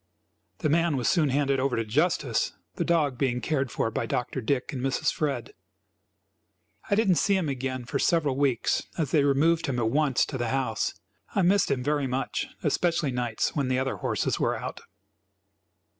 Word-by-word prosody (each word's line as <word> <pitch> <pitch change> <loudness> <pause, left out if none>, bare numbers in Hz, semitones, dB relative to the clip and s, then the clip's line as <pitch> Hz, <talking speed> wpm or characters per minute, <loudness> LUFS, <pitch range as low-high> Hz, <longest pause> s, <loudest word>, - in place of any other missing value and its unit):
The - - -1
man 165 -1 +2
was 125 - -1
soon 160 -6 +3
handed 140 0 +1
over 130 -1 +1
to 115 - -1
justice, 135 0 +1 0.2
the - - -2
dog 150 -7 +1
being 125 -3 +1
cared 135 +1 -1
for 115 - -1
by 115 - -2
Dr. 125 +3 -2
Dick 130 +5 -1
and 130 - -4
Mrs. 135 0 0
Fred. 150 - -2 1.4
I 200 - +3
did 220 +1 +2
not 180 -3 +4
see 200 - +3
him 180 -4 -1
again 130 -2 -3
for - - -2
several 150 -6 +2
weeks, 135 -4 +1
as 155 -6 -1
they 150 - +4
removed 155 +4 +2
him 130 -3 -1
at 115 -2 +1
once 145 -2 +2
to 130 - -5
the 120 -1 -1
house. 125 -4 -1 0.4
I 195 - +3
missed 190 +2 +3
him 135 -3 0
very 145 0 0
much, 130 +1 -2 0.2
especially 170 -5 +1
nights 120 -3 -1
when 140 -3 0
the 130 0 +1
other 130 0 -1
horses - - -1
were - - +1
out. - - -6
140 Hz, 190 wpm, -27 LUFS, 125-155 Hz, 1.4 s, not